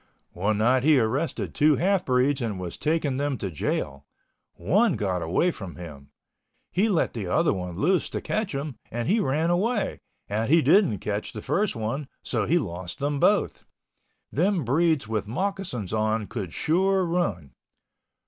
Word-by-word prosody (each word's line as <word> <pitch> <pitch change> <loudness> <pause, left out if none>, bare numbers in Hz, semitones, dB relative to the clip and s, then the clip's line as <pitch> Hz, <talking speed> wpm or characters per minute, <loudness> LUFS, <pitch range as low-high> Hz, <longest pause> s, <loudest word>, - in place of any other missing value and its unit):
One 105 +4 0
night 125 +4 +3
he 150 +2 +5
arrested 115 +8 -1
two 150 0 +4
half 185 +4 +1
breeds 130 +2 +2
and 110 -5 -2
was 90 -2 -5
taking 150 -4 0
them 140 -1 -1
to 95 -4 -4
jail. 70 -2 -3 0.5
One 205 +3 +2
got 95 -3 -1
away 95 - +1
from 95 - -8
him. 75 -5 -10 0.6
He 205 +5 +2
let 180 -6 +1
the 105 -6 -4
other 90 - +2
one 90 -3 -5
loose 180 - +1
to - - -3
catch 215 -7 -2
him 140 -4 -5
and 120 +1 -3
he 210 +7 +3
ran 155 +2 +1
away, 205 +5 0 0.3
and 110 +3 -1
he 165 +1 +5
didn't 185 - +4
catch 105 0 -3
the 105 - -6
first 185 +7 0
one, 115 +6 -3 0.2
so 115 -5 -1
he 170 - +3
lost 90 - -4
them 145 0 -1
both. - - +1 0.6
Them 180 +2 +1
breeds 155 +1 +2
with 110 -2 -2
moccasins 175 - -3
on 110 0 0
could 100 -6 -5
sure 190 - +2
run. 105 - -2
130 Hz, 165 wpm, -26 LUFS, 105-170 Hz, 0.6 s, he